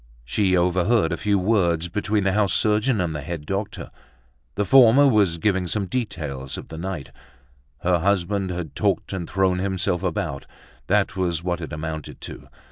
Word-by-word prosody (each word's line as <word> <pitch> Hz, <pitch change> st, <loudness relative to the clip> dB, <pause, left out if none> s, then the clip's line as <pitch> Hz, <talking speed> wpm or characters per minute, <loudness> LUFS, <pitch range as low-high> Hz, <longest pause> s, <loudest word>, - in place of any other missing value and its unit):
She 95 Hz, -, +1 dB
overheard 90 Hz, +2 st, +2 dB
a -, -, 0 dB
few 100 Hz, +2 st, +1 dB
words 90 Hz, -4 st, +1 dB
between 105 Hz, +3 st, -1 dB
the 95 Hz, -, +2 dB
house 105 Hz, 0 st, +2 dB
surgeon 110 Hz, +2 st, +2 dB
and 85 Hz, -4 st, -1 dB
the 75 Hz, -, -4 dB
head 75 Hz, +1 st, -6 dB
doctor. 100 Hz, +4 st, -4 dB, 0.6 s
The 105 Hz, -, 0 dB
former 135 Hz, +3 st, +7 dB
was 100 Hz, -9 st, +3 dB
giving 95 Hz, +1 st, 0 dB
some 100 Hz, +3 st, -1 dB
details 75 Hz, -, -4 dB
of -, -, -9 dB
the 80 Hz, -, -8 dB
night: 85 Hz, -6 st, -5 dB, 0.7 s
her 90 Hz, -1 st, +2 dB
husband 100 Hz, +1 st, 0 dB
had 85 Hz, -5 st, -5 dB
talked -, -, -1 dB
and 90 Hz, -3 st, -4 dB
thrown 95 Hz, -1 st, +1 dB
himself 95 Hz, -2 st, -1 dB
about, 70 Hz, 0 st, -3 dB, 0.4 s
that -, -, +1 dB
was 85 Hz, -3 st, -1 dB
what 90 Hz, -1 st, -2 dB
it 80 Hz, -, -6 dB
amounted 80 Hz, 0 st, -6 dB
to. -, -, -9 dB
90 Hz, 170 wpm, -23 LUFS, 85-105 Hz, 0.7 s, former